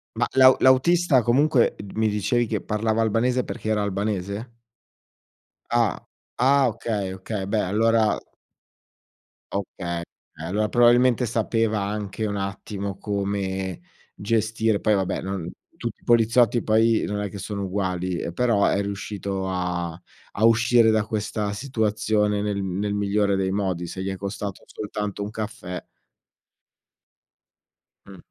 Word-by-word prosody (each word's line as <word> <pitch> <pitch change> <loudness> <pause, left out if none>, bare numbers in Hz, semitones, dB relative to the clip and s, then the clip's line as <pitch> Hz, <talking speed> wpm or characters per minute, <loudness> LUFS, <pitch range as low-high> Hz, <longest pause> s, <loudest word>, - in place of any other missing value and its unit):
Ma - - +1
l'au 130 0 +7
l'autista, 135 +2 +4
comunque, 125 +2 +3
d 100 -1 -8
mi 110 0 +2
dicevi 105 +4 +1
che 110 -2 -2
parlava 110 +2 0
albanese 120 +3 +1
perché 110 - -5
era 110 -1 +1
albanese? 100 +3 -3 1.2
Ah. 120 -2 +1 0.4
Ah! 135 +1 +5
Okay, 100 -5 -3
okay 95 +1 -4
beh 105 +1 +1
allora 115 0 +3 1.4
Okay, 90 -3 -3 0.4
eh, 80 - -8
allora 105 +5 0
probabilmente 120 +1 +4
sapeva 115 -1 0
anche 100 +1 -3
un 100 -1 -2
attimo 100 0 -4
come 100 -3 -3 0.3
gestire 110 0 0
poi 110 - +2
vabbè, 95 -2 -1
non 95 -3 -4 0.2
tutti - - -5
i - - -26
poliziotti 120 0 +4
poi 110 +1 +3
non 105 0 -3
è 105 0 -3
che 100 - -8
sono 100 +1 -4
uguali, 95 -2 -2
ehm, - - -4
però 110 +1 +2
è - - +1
riuscito 100 -1 -4
a 90 -2 -2 0.4
a 110 - +2
uscire 115 0 +5
da 110 -1 +3
questa 105 -1 -2
situazione 110 -3 0
nel 100 -1 -2
nel 100 +2 -2
migliore 100 0 +1
dei 95 -1 0
modi, 95 -3 -1
se 95 - -6
gli 95 - -3
è 95 - -3
costato 100 0 -5
soltanto 105 -1 -5
un 100 +1 -4
caffè. 110 -4 -6 2.2
Mh. 100 -1 -12
105 Hz, 135 wpm, -24 LUFS, 100-115 Hz, 2.2 s, l'au